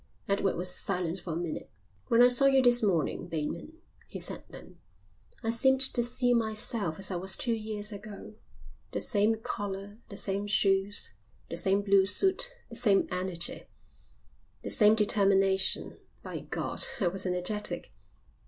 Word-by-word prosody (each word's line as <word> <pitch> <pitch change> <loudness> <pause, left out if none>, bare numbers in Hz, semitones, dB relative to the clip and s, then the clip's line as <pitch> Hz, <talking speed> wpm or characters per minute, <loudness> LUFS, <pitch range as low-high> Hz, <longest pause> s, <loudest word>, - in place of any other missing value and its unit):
Edward 200 -1 0
was 180 +1 -1
silent 180 -2 -3
for 175 -2 -6
a - - -4
minute. 170 -2 -5 0.4
"When 235 +1 +5
I - - +8
saw 250 +2 +4
you 270 -1 +4
this 245 -1 +5
morning, 180 -8 0
Bateman," 165 - -4 0.3
he - - -8
said - - -4
then, - - -12 0.6
"I 225 - 0
seemed 265 +3 +3
to 255 -2 +1
see 245 +1 +1
myself 220 -6 +1
as 195 0 -2
I 180 - -2
was 190 +2 0
two 235 - -1
years 215 -1 -4
ago. 205 +1 -9 0.6
The - - -1
same 215 0 +1
collar, 200 -5 -4
and 205 +3 -16
the 200 - -8
same 200 +1 -2
shoes, 200 0 +1 0.4
the - - -3
same 195 +1 +1
blue 195 -1 +4
suit, 380 - +2 0.2
the 230 - -11
same 215 -4 +3
energy. 180 -2 -1 1.0
The - - -4
same 215 0 +5
determination. 195 -2 +2 0.2
By - - -6
God, - - -4 0.2
I 195 - +1
was 190 +2 -2
energetic. 180 +4 -1
205 Hz, 160 wpm, -29 LUFS, 190-230 Hz, 1.0 s, I